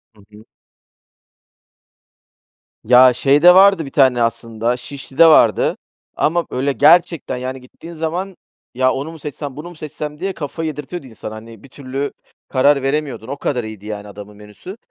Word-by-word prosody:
Hı 105 - -20
hı. 105 +1 -16 2.4
Ya, 125 +2 +6
şeyde 145 +8 +5
vardı 190 -4 +5
bir - - -9
tane 130 -4 +3
aslında, 115 +1 -2
Şişli'de 140 +4 +1
vardı 160 - +4 0.4
ama, 170 +3 0
böyle, 135 +2 -1
gerçekten, 165 -2 +3
yani, 130 +1 -6
gittiğin 165 +6 -13
zaman: 175 +4 -4 0.4
"Ya 130 +1 +2
onu 145 +5 -5
mu 160 - -12
seçsem, 145 -1 -7
bunu 160 +4 -8
mu 175 - -12
seçsem?" 150 -1 -7
diye, 195 +1 -2
kafayı 160 +1 -5
yedirtiyordu 150 +1 -7
insana. 110 -2 -9
Hani, 115 0 -12
bir 135 - -15
türlü 135 +1 -5 0.4
karar 140 +1 +2
veremiyordun, 135 -4 -3
o 140 - -4
kadar 125 -4 -2
iyiydi, 110 -1 -10
yani, 105 -1 -7
adamın 105 0 -12
menüsü. 105 - -12
135 Hz, 155 wpm, -18 LUFS, 120-155 Hz, 2.4 s, Ya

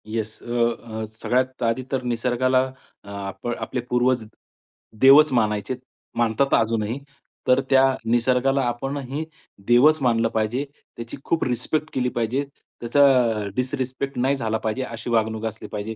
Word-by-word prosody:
Yes, 110 0 -4
अ, 120 - -5 0.3
अ, 110 -1 -5 0.2
सगळ्यात 130 +1 0
आधी 115 +2 0
तर 135 -2 0
निसर्गाला 125 +2 +1 0.4
आप 100 +1 -7
आपले 120 +1 -3
पूर्वज 125 -1 +2 0.8
देवच 145 +3 +8
मानायचेत, 105 +1 0 0.4
मानतात 120 +4 +1
अजूनही. 115 +2 +1 0.5
तर 125 +1 +5
त्या 135 -1 +6 0.2
निसर्गाला 125 +4 +2
आपणही 135 +4 -3 0.4
देवच 145 +6 +5
मानलं 115 -3 +2
पाहिजे. 115 +6 -1 0.3
त्याची 115 +2 -7
खूप 165 - 0
रिस्पेक्ट 135 +5 -1
केली 125 -1 0
पाहिजे. 120 +4 0 0.4
त्याचा 130 +5 +3 0.5
डिसरिस्पेक्ट 130 +1 -3
नाही 135 +3 +2
झाला 110 -4 -1
पाहिजे, 110 +4 -2
अशी 115 -1 -7
वागणूक 110 -1 0
असली 110 -1 -5
पाहिजे. 105 +2 -4
120 Hz, 130 wpm, -23 LUFS, 115-130 Hz, 0.8 s, देवच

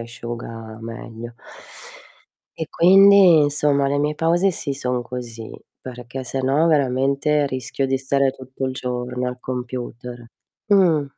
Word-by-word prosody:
asciuga 115 -1 -8
meglio". 115 0 -9 1.2
E 160 - -5
quindi, 190 -2 +6
insomma, 145 -1 +2
le 145 +1 0
mie 150 +1 0
pause 175 +4 +1
sì 140 -4 -4
son 125 -2 -2
così, 120 -2 -8 0.3
perché 125 +1 -8
se 135 +2 -4
no 140 +5 +2
veramente 140 +1 +1
rischio 130 +1 -3
di 135 0 0
stare 135 0 +1
tutto 130 0 -8
il 130 - -3
giorno 125 0 -4
al 125 0 -5
computer. 125 -1 -6 0.4
Mh. 180 -8 +3
130 Hz, 130 wpm, -21 LUFS, 125-150 Hz, 1.2 s, quindi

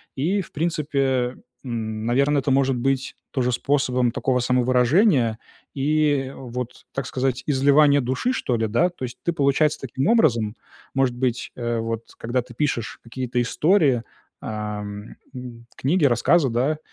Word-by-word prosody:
И 180 +9 0
в 180 - -11
принципе, 140 -6 0 0.3
м, 110 -3 -4
наверное, 140 +4 +2
это 135 - -1
может 135 0 +3
быть 135 +1 -1 0.2
тоже 125 -2 0
способом 125 -2 +1
такого 130 +1 0
самовыражения 125 - +3 0.3
и 145 -1 +1
вот, 125 -1 -7
так 135 -2 -3
сказать, 130 -1 -1
изливание 145 +1 +4
души 130 - -1
что 125 - -1
ли, 115 -1 0
да? 120 +12 +2
То 175 - -10
есть 120 - -8
ты 170 - 0
получается 145 +1 +2
таким 135 +1 -2
образом, 120 - +3 0.4
может 135 -2 +1
быть, 125 -1 -2
э, 120 -1 -2
вот 115 0 -3 0.2
когда 120 +2 -1
ты 120 - -14
пишешь 120 -4 -2
какие-то 125 +1 -2
истории, 140 - +2 0.4
а, 105 -1 -4
м, 115 +4 -10
книги, 155 +4 +1
рассказы, 135 +4 +3
да, 130 +7 0
130 Hz, 145 wpm, -23 LUFS, 120-145 Hz, 0.4 s, изливание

